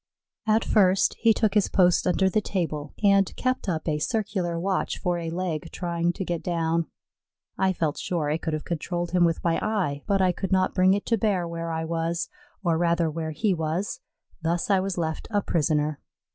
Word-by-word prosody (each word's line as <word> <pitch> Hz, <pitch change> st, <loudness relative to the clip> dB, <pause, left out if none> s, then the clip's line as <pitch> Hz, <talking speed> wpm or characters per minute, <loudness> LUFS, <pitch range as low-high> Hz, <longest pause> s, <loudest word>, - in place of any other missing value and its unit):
At 220 Hz, +1 st, +3 dB
first 190 Hz, -2 st, +4 dB
he 230 Hz, -, +5 dB
took 215 Hz, -1 st, +2 dB
his 210 Hz, -2 st, +3 dB
post 180 Hz, -2 st, +3 dB
under 190 Hz, +1 st, +3 dB
the 200 Hz, +3 st, +2 dB
table 155 Hz, -7 st, -3 dB
and 200 Hz, -1 st, +4 dB
kept 255 Hz, -5 st, -1 dB
up 160 Hz, -2 st, -2 dB
a 150 Hz, -1 st, 0 dB
circular 195 Hz, -4 st, -1 dB
watch 190 Hz, +2 st, -1 dB
for 175 Hz, -2 st, -1 dB
a 165 Hz, -1 st, -4 dB
leg 170 Hz, -3 st, -3 dB
trying 170 Hz, -1 st, -1 dB
to 190 Hz, -, -4 dB
get 170 Hz, -2 st, -2 dB
down. 165 Hz, -1 st, 0 dB, 0.7 s
I 190 Hz, 0 st, +2 dB
felt 160 Hz, -5 st, -1 dB
sure 165 Hz, -4 st, -1 dB
I 155 Hz, -, +1 dB
could 160 Hz, -, -3 dB
have 155 Hz, -, -2 dB
controlled 175 Hz, +1 st, -3 dB
him 180 Hz, -1 st, +4 dB
with 165 Hz, -1 st, 0 dB
my 165 Hz, -1 st, +2 dB
eye, 185 Hz, -10 st, -1 dB
but 200 Hz, -2 st, +2 dB
I 185 Hz, -1 st, +4 dB
could 190 Hz, +1 st, -4 dB
not 185 Hz, -1 st, +2 dB
bring 185 Hz, +1 st, +4 dB
it 200 Hz, -, -3 dB
to 230 Hz, -2 st, +1 dB
bear 190 Hz, -5 st, +1 dB
where 170 Hz, 0 st, -4 dB
I 160 Hz, 0 st, -2 dB
was, 165 Hz, +1 st, -2 dB, 0.3 s
or 165 Hz, -3 st, +2 dB
rather 170 Hz, -1 st, +2 dB
where 160 Hz, 0 st, -3 dB
he 195 Hz, +6 st, 0 dB
was; 170 Hz, -, -2 dB, 0.4 s
thus 170 Hz, +4 st, 0 dB
I 195 Hz, -, +5 dB
was 190 Hz, -1 st, -2 dB
left 160 Hz, -2 st, -2 dB
a 205 Hz, -3 st, 0 dB
prisoner. 150 Hz, -2 st, 0 dB
175 Hz, 200 wpm, -26 LUFS, 165-195 Hz, 0.7 s, he